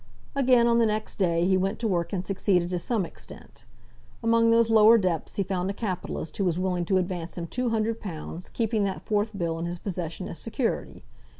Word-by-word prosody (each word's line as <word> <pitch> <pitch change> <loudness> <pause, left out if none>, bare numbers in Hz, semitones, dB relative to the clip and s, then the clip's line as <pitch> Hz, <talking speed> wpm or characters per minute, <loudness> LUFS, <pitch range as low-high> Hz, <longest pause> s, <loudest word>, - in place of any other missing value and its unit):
Again, 255 -3 +4
on 235 0 +4
the 230 - +4
next 215 0 -2
day, 170 -2 +2
he 190 +1 +3
went 195 +3 -1
to 230 - -1
work 175 -4 0
and 190 -2 -2
succeeded 185 -3 +1
to 180 - 0
some 205 +2 0
extent. - - -13 0.6
Among 230 0 +4
those 230 0 +4
lower 220 +1 +7
depths 180 -6 -1
he 200 - +1
found 190 0 -2
a - - -1
capitalist 185 -6 -4
who 200 - 0
was 175 -3 +1
willing 180 -1 -1
to 190 +2 +2
advance 180 -2 -3
him 170 - -3
two 250 +8 -1
hundred 225 0 0
pounds, 170 -1 -7
keeping 220 -2 0
that 195 - -3
fourth 210 0 0
bill 165 -3 -2
in 170 - -2
his 175 +1 -3
possession 180 -1 -5
as - - -6
security. 230 +1 -3
195 Hz, 210 wpm, -26 LUFS, 175-225 Hz, 0.6 s, lower